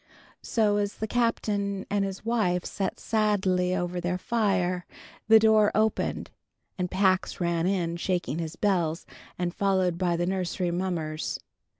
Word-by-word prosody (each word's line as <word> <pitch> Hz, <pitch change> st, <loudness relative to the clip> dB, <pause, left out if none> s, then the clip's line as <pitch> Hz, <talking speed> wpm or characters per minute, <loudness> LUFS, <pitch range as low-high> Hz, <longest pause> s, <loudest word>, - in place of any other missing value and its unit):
So 210 Hz, -3 st, +1 dB
as 205 Hz, 0 st, -1 dB
the 220 Hz, -, -3 dB
Captain 205 Hz, -4 st, 0 dB
and 205 Hz, -1 st, +2 dB
his 195 Hz, +2 st, -5 dB
wife 205 Hz, -7 st, +1 dB
sat 195 Hz, -1 st, -3 dB
sadly 190 Hz, -4 st, +1 dB
over 175 Hz, 0 st, -2 dB
their 180 Hz, +1 st, -1 dB
fire, 185 Hz, -4 st, 0 dB, 0.4 s
the 220 Hz, +1 st, +8 dB
door 220 Hz, -1 st, +5 dB
opened, 215 Hz, 0 st, 0 dB, 0.4 s
and 180 Hz, -1 st, -2 dB
Pax 185 Hz, 0 st, +1 dB
ran 170 Hz, -1 st, 0 dB
in 175 Hz, -3 st, 0 dB
shaking 175 Hz, -3 st, -1 dB
his 165 Hz, -1 st, -4 dB
bells, 170 Hz, -5 st, 0 dB, 0.3 s
and 175 Hz, -1 st, -2 dB
followed 185 Hz, -3 st, +1 dB
by 175 Hz, -2 st, +1 dB
the 175 Hz, -, 0 dB
nursery 180 Hz, -1 st, -1 dB
mummers. 170 Hz, -4 st, -2 dB
185 Hz, 140 wpm, -27 LUFS, 175-205 Hz, 0.4 s, the